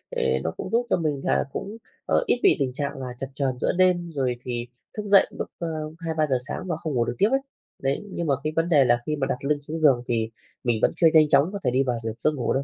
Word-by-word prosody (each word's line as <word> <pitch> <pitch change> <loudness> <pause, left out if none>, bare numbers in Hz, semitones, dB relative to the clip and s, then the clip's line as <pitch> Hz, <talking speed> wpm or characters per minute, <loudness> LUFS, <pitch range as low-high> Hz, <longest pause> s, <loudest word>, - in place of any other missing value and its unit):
ề 65 0 +1
nó 80 - -1
cũng - - -5
giúp 235 +1 +2
cho - - +3
mình 150 -5 -1
là - - +2
cũng, 210 +3 -5 0.3
ờ, - - +2
ít 245 - +3
bị - - +6
tình 130 -3 0
trạng 140 0 -3
là 130 - -4
chập 135 - -3
chờn 135 -3 -1
giữa - - +2
đêm, 180 -2 +3
rồi 130 -5 -1
thì 120 -1 -3 0.3
thức 210 - -2
dậy 200 -1 +6
lúc, - - -5
ơ, 170 - -2 0.3
2-3 160 -2 0
giờ 130 -3 +2
sáng - - -4
và 175 - -1
không 155 -2 -4
ngủ 120 -2 +2
được 120 - -3
tiếp 205 - +4
ấy. 270 - +3 0.4
Đấy, 135 +1 0
nhưng 170 -2 -3
mà 140 - +3
cái 155 0 -2
vấn 165 +1 +1
đề 145 -5 +5
là 120 -1 +3
khi 150 - -1
mà 135 -3 -1
đặt 125 - -1
lưng 145 +1 +1
xuống 160 +2 -4
giường 135 -6 +4
thì 115 -2 0 0.3
mình 120 -3 +1
vẫn - - +3
chưa 165 - +5
nhanh 155 -2 +6
chóng 140 +4 +4
có 200 - -3
thể 125 - +2
đi 130 +2 +2
vào 125 -2 0
dược 110 0 -5
giấc 155 - +2
ngủ 135 -6 -1
đâu. 135 - 0
145 Hz, 285 wpm, -25 LUFS, 125-165 Hz, 0.4 s, bị